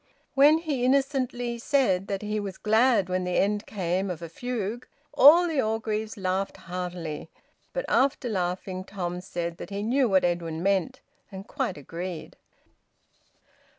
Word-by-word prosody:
When 290 +3 +6
he 300 -6 -2
innocently 255 -3 0
said 230 -8 +1
that 195 0 -3
he 210 0 -2
was 195 -2 -5
`glad 220 -2 +3
when 185 0 -1
the 180 0 -1
end 205 +1 +1
came 190 -1 -1
of 170 -2 -5
a 165 - -6
fugue,' 235 +3 -4 0.3
all 305 +5 +8
the 310 -5 +1
Orgreaves 220 -1 -2
laughed 190 0 -2
heartily, 175 -4 -5 0.4
but - - -3
after 265 -1 +2
laughing, 185 -2 -2
Tom 180 -2 -4
said 170 -2 -4
that - - -8
he 200 0 -4
knew 250 +2 +2
what 190 -1 +4
Edwin 170 -2 -2
meant 200 +7 0 0.3
and 190 0 -8
quite 255 - -2
agreed. 170 +4 -7
200 Hz, 150 wpm, -27 LUFS, 180-250 Hz, 0.4 s, all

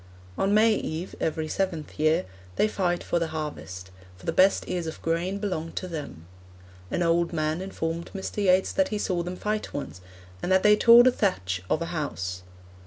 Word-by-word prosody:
On 195 - +1
May 215 +2 +5
Eve, 170 -3 -4
every 160 0 -1
seventh 165 -4 -3
year, 155 -4 +3 0.3
they - - +3
fight 180 -4 -1
for 170 - 0
the 165 - -1
harvest, 150 - -6 0.3
for 90 - -15
the - - +1
best 195 +1 +3
ears 175 -2 -2
of 160 - -6
grain 170 +4 0
belong 180 -6 -3
to 185 - -4
them. 150 - -7 0.6
An 175 - 0
old 170 0 +2
man 155 +1 -1
informed 170 -3 -4
Mr. 195 - -5
Yeats 185 0 +3
that 285 -1 +2
he 215 - -2
saw 185 -4 -1
them 180 +1 -5
fight 210 +3 -3
once, 115 -10 -6 0.4
and 185 - -2
that 190 0 +4
they 210 0 +7
tore 235 +2 +8
the 255 - +6
thatch 95 - -1
off 155 - +1
a - - -1
house. 120 - -4
170 Hz, 190 wpm, -26 LUFS, 155-195 Hz, 0.6 s, tore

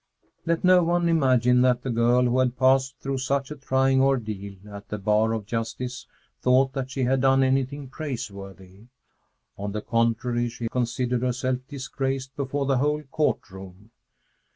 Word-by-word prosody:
II - - -38 0.2
Let 165 0 0
no 180 0 +6
one 170 +1 +1
imagine 125 -6 +3
that 125 -1 +2
the 130 - -2
girl 120 +2 +3
who 125 +1 +2
had 125 -1 +1
passed 130 0 +3
through 135 -1 -3
such 135 +2 -1
a - - -4
trying 135 -1 +2
ordeal 110 -7 -1
at 100 -1 -10
the 105 - -3
bar 105 +2 +2
of 110 -2 -3
justice 120 +3 -4 0.3
thought 130 +1 +3
that 135 -1 -3
she 130 0 -2
had 130 +1 +2
done 135 0 +4
anything 135 +1 0
praiseworthy! 100 - -8 0.7
On 100 0 -4
the 105 - -3
contrary, 115 +1 0
she 115 0 -5
considered 125 0 -1
herself 125 0 -1
disgraced 135 -1 -4
before 140 0 -2
the 135 -2 +1
whole 150 +2 0
court 150 +2 -1
room. 95 +3 -12
125 Hz, 165 wpm, -25 LUFS, 115-135 Hz, 0.7 s, no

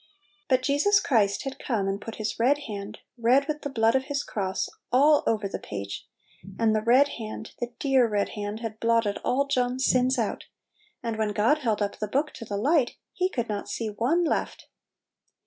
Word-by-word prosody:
But 255 -1 +3
Jesus 345 +9 +4
Christ 210 - +2
had 270 0 -6
come 215 -6 0
and 195 +1 -2
put 225 - -7
His 215 +1 -4
red 265 +5 +4
hand, 205 0 -7 0.2
red 255 +5 +4
with 300 -1 -3
the 285 - -4
blood 225 -3 +2
of 265 0 +1
His 285 0 -2
cross, 190 -2 -2 0.2
all 290 +4 +5
over 215 -3 +1
the - - -5
page, 100 0 -6 0.5
and 220 -1 +2
the 215 - +1
red 250 +6 +5
hand, 220 0 -7
the 240 - -1
dear 265 -4 +3
red 205 -2 0
hand, 210 +1 -5
had 220 -2 -5
blotted 230 -3 +1
all 275 +3 +1
John's 255 -1 0
sins 255 +1 +3
out; 225 -3 -2 0.6
and 230 -2 -3
when 215 -1 0
God 230 +9 +3
held 220 -6 0
up 200 - -4
the 210 - -2
book 285 +8 0
to 230 - -9
the 205 -1 -3
light, 275 +3 +2 0.2
He 370 0 0
could 240 -9 -2
not 205 -1 -4
see 220 +2 -3
one 260 +12 +1
left! 330 - -2
230 Hz, 200 wpm, -26 LUFS, 210-270 Hz, 0.6 s, all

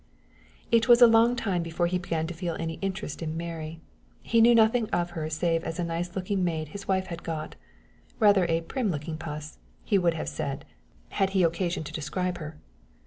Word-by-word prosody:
It 230 0 +4
was 240 -1 +7
a 245 - +10
long 230 +1 +5
time 195 -7 -1
before 170 +1 -1
he 180 +1 0
began 165 -2 -2
to 175 - -5
feel 170 -1 -3
any 165 0 -4
interest 195 -5 -4
in 160 0 -3
Mary. 165 -1 -6 0.4
He 230 -1 +3
knew 235 +1 +7
nothing 225 0 +4
of 175 0 -1
her 160 -2 -4
save 165 +1 0
as 165 - -4
a 175 - -1
nice 170 +1 -3
looking 190 0 -1
maid 160 -3 -2
his 200 +5 -9
wife 190 -1 +1
had 170 - -7
got 160 -2 -5 0.6
rather 200 -4 +5
a 165 0 +1
prim 225 +6 -2
looking 155 -1 -4
puss, 150 -1 -7 0.3
he 200 -3 +3
would 170 -2 +2
have 160 - -4
said, 140 -1 -4 0.4
had 195 -1 +1
he - - +4
had 170 - +5
occasion 170 0 -2
to 150 - -8
describe 180 +4 -2
her. 155 -1 -7
175 Hz, 205 wpm, -27 LUFS, 160-195 Hz, 0.6 s, a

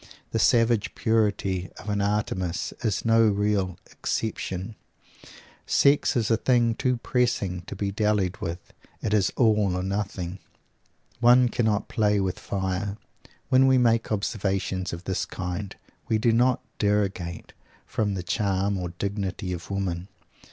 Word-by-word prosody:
The 115 - 0
savage 115 -2 +3
purity 100 -5 0
of - - -11
an 105 -1 0
Artemis 95 -3 -1
is 110 -1 0
no 115 0 +5
real 100 -3 0
exception. 100 -2 -3 0.9
Sex 140 +1 +3
is 115 -2 +1
a 115 - +4
thing 120 -1 +3
too 125 +1 0
pressing 115 -8 0
to - - -6
be 100 +1 -2
dallied 105 -2 +1
with. 85 +1 -6 0.3
It 105 - 0
is 100 -3 +3
all 105 -6 +3
or 90 - -2
nothing. 95 -2 -3 0.8
One 125 +1 +6
cannot 110 -3 0
play 105 -3 +2
with 95 -2 -1
fire. 95 +1 -2 0.5
When 130 +1 +5
we 130 -1 +5
make 115 -2 +2
observations 95 -3 -1
of 85 +1 -6
this 95 -1 -1
kind 95 +2 -5 0.3
we 110 - +2
do 115 +2 +3
not 125 +2 +2 0.2
derogate 100 -5 -1 0.3
from 105 -3 -1
the 90 - -4
charm 100 +1 0
or 90 -1 -3
dignity 100 -2 -3
of 85 -1 -7
women. 95 -2 -2
100 Hz, 140 wpm, -26 LUFS, 95-115 Hz, 0.9 s, One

